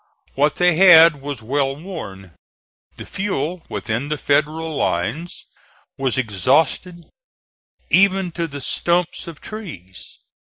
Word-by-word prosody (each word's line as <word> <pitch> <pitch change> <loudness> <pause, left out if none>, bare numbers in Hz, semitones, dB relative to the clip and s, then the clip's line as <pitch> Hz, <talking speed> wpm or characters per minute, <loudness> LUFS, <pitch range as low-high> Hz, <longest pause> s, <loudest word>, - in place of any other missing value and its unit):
What 145 +2 +1
they 180 -2 +2
had 165 -5 +7
was 140 -5 -6
well 135 +3 -1
worn. 100 - -9 0.6
The - - -10
fuel 180 -3 -3
within 120 +6 -3
the 150 - -2
Federal 155 +3 -1
lines 130 - -3 0.5
was 135 -1 -1
exhausted, 140 - 0 0.8
even 190 -1 +3
to 170 0 -3
the 140 -2 -8
stumps 175 +6 -1
of 165 -3 -9
trees. 150 - -10
150 Hz, 115 wpm, -20 LUFS, 135-175 Hz, 0.8 s, had